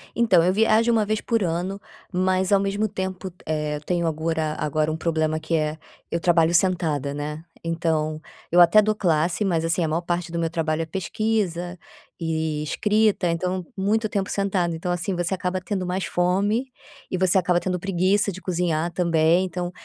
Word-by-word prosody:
Então 195 -8 +4
eu 185 +1 +3
viajo 225 +2 +3
1 220 -2 +2
vez 215 0 -1
por 230 -4 0
ano, 180 +4 -2 0.3
mas 185 +1 +1
ao 200 - +5
mesmo 200 +2 0
tempo, 190 -2 -5
eh, 150 -1 -2
tenho 170 -2 0
agora 160 -1 -1
agora 155 +1 0
um 160 - -3
problema, 160 -1 0
que 160 +1 -2
é 155 0 -1 0.3
eu 170 - 0
trabalho 170 -1 +3
sentada, 165 -7 +1
né, 150 +2 -5 0.2
então 160 -2 -1 0.3
eu 175 +1 +6
até 175 +5 +7
dou 215 0 +1
classe, 175 +1 +1
mas 165 -4 0
assim 165 +1 +1
a - - +1
maior 160 +3 0
parte 175 -1 -2
do 170 - -2
meu 165 -1 0
trabalho 160 -1 -1
é - - -5
pesquisa 185 -1 -2 0.4
e 160 -2 -1
escrita. 210 +3 +1
Então 180 +1 -2
muito 215 +3 +1
tempo 200 -1 -2
sentada, 185 -4 0
então 175 +2 -3
assim, 175 +2 -2
você 175 +2 -1
acaba 185 0 -2
tendo 185 0 -3
mais 180 -1 -2
fome 195 +9 +1 0.5
e 185 - 0
você 185 0 +3
acaba 180 -1 +2
tendo 180 0 -2
preguiça 195 +2 +1
de 190 - -8
cozinhar 175 -2 -1
também, 170 +1 +2
então 180 0 -4
175 Hz, 180 wpm, -24 LUFS, 165-190 Hz, 0.5 s, até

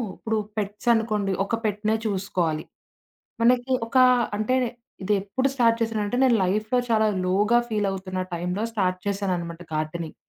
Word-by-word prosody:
ఇప్పుడు 220 0 -2 0.2
పెట్స్ 205 +2 -4
అనుకోండి 215 -3 0
ఒక 230 - -1
పెట్‌నే 210 +1 0
చూసుకోవాలి. 180 -6 -1 0.8
మనకి 245 +2 +3 0.2
ఒకా 255 +2 +5 0.3
అంటే, 215 +5 +1 0.5
ఇదెప్పుడు 205 +6 0
స్టార్ట్ 230 -3 +3
చేశానంటే 225 0 -1
నేను 255 -3 +5
లైఫ్‌లో 215 +6 +1
చాలా 220 -1 +3 0.2
లోగా 205 +6 +3
ఫీలవుతున్న 195 -3 -2 0.2
టైమ్‌లో 180 +4 -2
స్టార్ట్ 185 -4 0
చేశాననమాట 180 -4 -2
గార్డెనింగ్. 155 +1 -3
205 Hz, 125 wpm, -25 LUFS, 185-225 Hz, 0.8 s, ఒకా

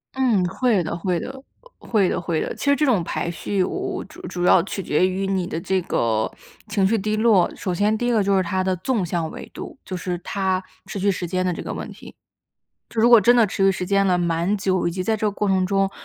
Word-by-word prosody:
嗯， 235 -9 +2
会 205 0 +1
的， 160 - -3
会 175 0 -1
的， 265 +6 -7 0.4
会 205 -5 +1
的， 175 - -1
会 165 -2 -1
的。 - - -3
其 - - -6
实 280 0 +4
这 300 - +1
种 220 -10 +2
排 170 +1 -3
序 190 +3 -1
我 - - -3 0.3
我 - - -6
主 340 +4 -14
主 175 0 -4
要 180 - +6
取 195 0 -5
决 180 +5 +2
于 190 +1 -2
你 190 -2 -1
的 165 - -3
这 190 +1 0
个 110 -8 0 0.4
情 205 -2 +1
绪 225 - +2
低 215 +2 -1
落， 215 -5 +4
首 185 - -3
先 210 +4 +1
第 240 - -2
一 - - +2
个 215 -3 +3
就 195 0 +2
是 190 - +2
它 185 +2 -1
的 185 0 0
纵 205 +4 -1
向 165 -2 -2
纬 - - -9
度， - - -8
就 185 - -5
是 180 -1 -3
它 190 0 -1 0.2
持 200 - -6
续 200 +2 +2
时 180 - -4
间 185 +1 -1
的 180 - 0
这 175 - -5
个 - - -5
问 - - -6
题。 - - -13 0.7
就 230 - -9
如 235 - +5
果 235 -3 +9
真 240 +5 +5
的 230 -3 +5
持 195 - -3
续 195 - +6
时 185 -1 -3
间 195 +1 +2
了 180 -1 +3
蛮 170 +3 0
久， 185 -3 0
以 - - -2
及 185 +2 -3
在 220 +4 0
这 215 0 -1
个 210 - +2
过 205 +1 -2
程 190 -1 +2
中， 195 0 +1
190 Hz, 285 characters per minute, -22 LUFS, 180-210 Hz, 0.7 s, 果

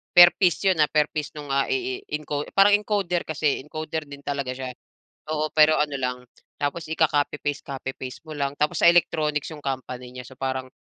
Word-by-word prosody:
Per 175 0 +11
piece 185 0 +2
yun, 175 -4 +1
ah, 150 - +4
per 150 -1 +2
piece 150 -1 -3
nung, 145 -2 -8
ah, 140 - +2
i 385 -1 -1
i 405 - -4
enco 145 -1 -3
parang 200 +1 +6
encoder 200 -4 -1
kasi, 150 -3 0
encoder 155 +1 -5
din 140 0 -10
talaga 140 -3 -2
siya, 130 -1 -5 0.6
oo. 155 0 -1
Pero 155 0 +6
ano 150 -1 0
lang, 125 -1 -1 0.4
tapos 145 +4 -2
ika-copy 150 -2 +1
paste-copy 140 -2 -4
paste 130 -1 -7
mo 155 - -8
lang, 140 -1 -1
tapos 150 +2 0
sa 170 - +8
electronics 155 -4 +2
yung 150 - -10
company 125 -2 -5
niya. 125 0 -7
So 130 +1 -14
parang, 130 -1 -3
150 Hz, 200 wpm, -24 LUFS, 140-160 Hz, 0.6 s, Per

